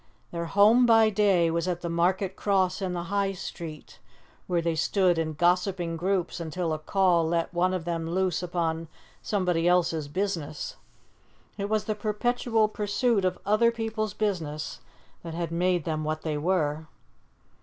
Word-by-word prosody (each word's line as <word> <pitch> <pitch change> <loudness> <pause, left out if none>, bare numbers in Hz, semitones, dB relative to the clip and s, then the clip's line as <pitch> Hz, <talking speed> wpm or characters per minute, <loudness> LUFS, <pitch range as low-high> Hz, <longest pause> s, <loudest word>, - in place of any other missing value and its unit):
Their 170 0 -3
home 215 +7 +5
by 225 -1 +5
day 195 -5 +3
was 170 +1 -1
at 175 -1 -2
the 175 - -3
Market 180 +3 0
Cross 190 -2 +1
in 185 -2 -2
the 175 -1 -3
High 200 -1 +1
Street, 165 -4 -8 0.5
where 175 -1 +1
they 170 0 0
stood 180 +1 +2
in 155 -1 -1
gossiping 175 +1 +1
groups 180 +1 -1
until 165 0 -2
a 155 - -3
call 175 0 +2
let 165 +1 -1
one 180 +1 +2
of 185 -3 -3
them 165 -1 -2
loose 185 -1 0
upon 165 -2 -2 0.3
somebody 180 -4 0
else's 170 -4 +2
business. 170 -3 -3 0.8
It 200 0 -4
was 215 -1 +1
the 215 - -1
perpetual 220 +1 0
pursuit 210 +1 0
of 185 - 0
other 215 +4 +4
people's 220 -2 -3
business 165 -8 -3 0.4
that 165 -1 -7
had 170 -1 -3
made 175 0 +1
them 155 -1 -2
what 155 +1 -3
they 155 -2 -2
were. 155 -1 0
180 Hz, 160 wpm, -27 LUFS, 165-200 Hz, 0.8 s, home